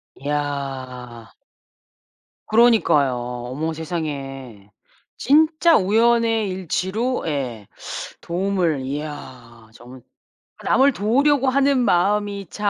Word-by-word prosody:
이야. 135 -5 -5 1.1
그러니까요. 215 - +4
어머 125 +6 -4
세상에. 135 - -6 0.5
진짜 315 +3 +4
우연의 225 +1 +2
일치로 190 +7 -2
예 125 -8 -4 0.5
도움을 175 -5 -1
이야 130 -5 -8
정말 125 +2 -14 0.6
남을 270 +2 +3
도우려고 270 +6 +2
하는 275 0 +2
마음이 200 -1 +1
참 205 -1 -1
165 Hz, 190 characters per minute, -21 LUFS, -, 1.1 s, 그러니까요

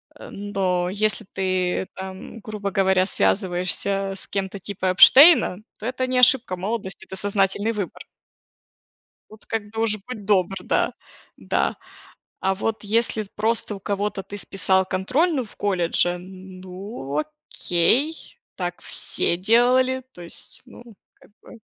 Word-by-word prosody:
э, - - -11
но 185 -3 -1
если 210 0 0
ты 185 -1 -1
там, 190 +4 -9
грубо 205 -2 -5
говоря, 190 -1 +2
связываешься 195 +1 0
с - - 0
кем-то 195 0 -3
типа 190 -1 -4
Эпштейна, 265 - +7 0.2
то 215 - -9
это 255 +1 -2
не 255 0 -1
ошибка 250 -5 +5
молодости, 195 +1 -4
это 190 - -9
сознательный 200 +2 +1
выбор. 200 -4 -6 1.3
Тут 215 0 -16
как 210 -2 -4
бы 225 0 -3
уж, 215 -2 +1
будь 220 -5 -7
добр, 195 -2 +1
да, - - 0 0.4
да. - - -1 0.6
А 190 0 +1
вот 220 +3 -3
если 220 +1 +1
просто 220 0 -1
у 195 - -10
кого-то 200 0 -3
ты 205 - -8
списал 190 -1 +1
контрольную 255 - 0
в - - -18
колледже, 175 -2 +1
ну, 185 - -8 0.3
окей, 240 - +1 0.2
так 175 -1 -5
все - - +1
делали, 250 +5 +3
то 175 - -12
есть, 170 - -8
ну, 240 - -14 0.4
как - - -21
бы 230 - -14
200 Hz, 135 wpm, -23 LUFS, 185-225 Hz, 1.3 s, Эпштейна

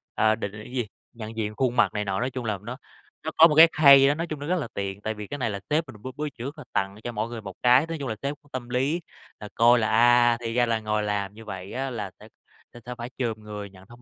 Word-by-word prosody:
à, 110 0 +3
định 100 -2 -5
định 105 +1 -10
cái 120 - -12
gì? 120 -5 -1 0.3
Nhận 110 -1 -8
diện 105 -1 -3
khuôn 125 0 0
mặt 120 - +3
này 105 0 -2
nọ, 95 -1 -1
nói 125 +2 -1
chung 125 -3 -5
là 105 -3 -1
nó 120 +3 -6 0.5
nó 160 - -3
có 165 - +9
một 150 - 0
cái 160 +2 +10
khay 140 -2 +8
đó, 145 - +4
nói 170 +2 -3
chung 155 -3 -5
nó 145 - -6
rất 180 +1 +1
là 140 - -4
tiện. 100 0 -4
Tại 110 - -2
vì 105 -1 -8
cái 145 - -5
này 120 -4 -1
là 100 - -4
sếp 155 +2 +2
mình 105 -5 -12
bữa 130 - -5
bữa 150 0 -2
trước 135 +5 -8
là 150 - -9
tặng 95 0 -1
cho 120 - -4
mỗi 115 0 -3
người 115 -2 -6
một 95 -3 -9
cái. 125 +5 +5
Nói 165 - -4
chung 135 - -4
là 110 - -3
sếp 140 +1 -2
cũng 145 - -26
tâm 125 -2 -6
lý 135 +8 0 0.4
là 105 - -8
coi 120 +1 +5
là, 110 - +1
à, 120 +1 +5
thì 115 -1 -3
ra 120 0 +3
là 115 -1 0
ngồi 105 -1 -1
làm 100 -1 -2
như 110 +1 -13
vậy 95 -2 -7
á 135 +1 -2
là 105 -6 -5
sẽ - - -14 0.6
sẽ 125 0 -6
phải 120 0 -6
chồm 115 -4 -2
người 105 -1 -8
nhận 95 0 -17
thông 120 +1 -16
120 Hz, 305 wpm, -25 LUFS, 105-135 Hz, 0.6 s, cái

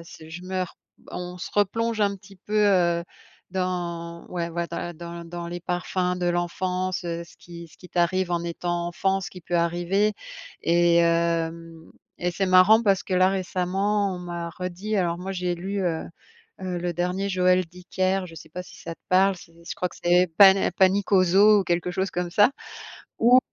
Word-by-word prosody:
c'est 160 -1 -13
je 175 +2 -8
meur 185 -1 -3 0.4
on 180 0 -6
se 180 - -7
replonge 220 +2 0
un 200 -1 +2
petit 195 0 -17
peu, 210 +3 -7
heu, 175 -3 +2 0.5
dans 175 -2 -3
ouais, 170 -2 -2
ouais, 170 0 -3
dans - - -4
la 175 - -4
dans 170 +1 -8
dans 170 0 -6
les 175 +1 -5
parfums 180 +1 -1
de 180 - -1
l'enfance, 180 +2 -2
heu, 170 0 -4
ce - - -19
qui 170 -1 -11
ce - - -20
qui, 180 - -15
t'arrive 180 +1 +1
en 170 -1 0
étant 170 0 -3
enfant, 195 +2 0
ce 190 - -5
qui 180 - -12
peut 175 - -4
arriver, 175 +5 +1 0.5
et 170 0 +3
hem, 165 -1 0 0.3
et 175 - -1
c'est 195 +2 -1
marrant 185 +5 +6
parce 195 -3 +2
que - - -6
là, 185 0 +4
récemment, 195 +2 0
on - - -7
m'a 175 -1 -5
redit, 185 +5 -4
alors 170 -3 0
moi 190 +2 -5
j'ai 180 -1 -1
lu, 195 +3 -4
heu 165 -3 -1 0.6
heu, 180 -1 -3
le 175 0 -2
dernier 180 +3 -1
Joël 185 -1 +2
Dicker, 185 +2 -2
je 165 - -12
sais 160 0 -11
pas 180 +3 -6
si - - -15
ça 165 0 -7
te - - -45
parle? 190 +1 +4
C'est 165 -1 -15 0.2
je - - -4
crois 180 - -2
que - - -14
c'est 180 +1 +4
pané 195 -1 +7
Panique 195 +2 +2
au 185 - +6
zoo 200 +4 +6
ou - - -3
quelque 175 0 0
chose 190 +2 -2
comme 175 -1 -3
ça. 205 +6 +5 0.7
Où 245 +3 +6
180 Hz, 200 wpm, -25 LUFS, 170-190 Hz, 0.7 s, pané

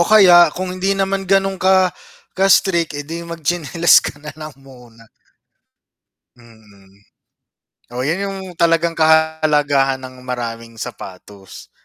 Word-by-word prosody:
o - - +4
kaya 180 -6 +7
kung 185 0 -4
hindi 195 +2 -1
naman 195 -1 -2
ganun 195 -1 +1
ka, 185 -1 +3 0.4
ka-strict, 185 -4 +1
eh 145 - -6
di 165 +3 -7
magtsinelas 170 0 +1
ka - - -7
nalang 155 0 -10
muna. 125 -4 -18 1.3
Mm. 105 -4 -21 1.0
O 125 - -3
yun 170 +8 -2
yung 195 0 -6 0.2
talagang 170 0 +2
kahalagahan 155 -4 +1
ng 130 0 -11
maraming 115 -2 -6
sapatos. 95 +1 -11
160 Hz, 115 wpm, -17 LUFS, 125-180 Hz, 1.3 s, kaya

